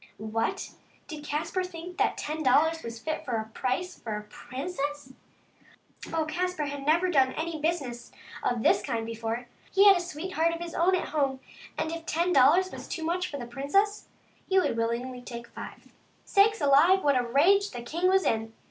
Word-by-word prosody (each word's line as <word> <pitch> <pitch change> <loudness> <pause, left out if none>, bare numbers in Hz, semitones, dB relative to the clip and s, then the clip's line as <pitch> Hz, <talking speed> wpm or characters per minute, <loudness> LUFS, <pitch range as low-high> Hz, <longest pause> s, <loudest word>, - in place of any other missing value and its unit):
What! 220 +1 -2 0.4
did 305 -3 -8
Caspar 305 +5 -2
think 355 0 -8
that - - +2
ten 310 +1 -4
dollars 310 +4 +3
was 230 -3 -7
a - - -21
fit 315 0 -3 0.3
price 310 +9 -2
for 215 -2 -4
a 210 - -7
princess! 285 +3 -5 1.0
Oh, 320 -1 0
Caspar 355 0 -2
had 285 0 -5
never 340 +4 +3
done 265 -4 +3
any 320 -1 -4
business 280 -7 -2 0.3
of 240 -2 -1
this 205 - +4
kind 225 +1 -2
before. 230 +1 -4 0.3
He 395 +2 +6
had 395 - +9
a - - -2
sweetheart 335 0 -1
of - - -7
his 340 -1 -6
own 360 +3 +3
at 365 - -2
home, 275 -3 0 0.4
and 320 - -1
if 330 0 -6
ten 345 +3 +1
dollars 355 +8 +5
was - - -8
too 330 - -4
much 360 +3 -1
for 285 - -5
the 245 - -6
princess 340 - 0 0.4
he 385 - +3
would 370 - +4
be - - -1
willing 235 +3 -2
to 250 - -9
take 235 -1 -8
five. - - -10 0.3
Sakes 410 0 +3
alive! 300 +7 +5
what 285 -1 +3
a 250 - +3
rage 340 +12 +3
the 245 -2 -7
king 335 +9 0
was 380 0 +3
in 225 0 0
305 Hz, 190 wpm, -28 LUFS, 250-355 Hz, 1.0 s, had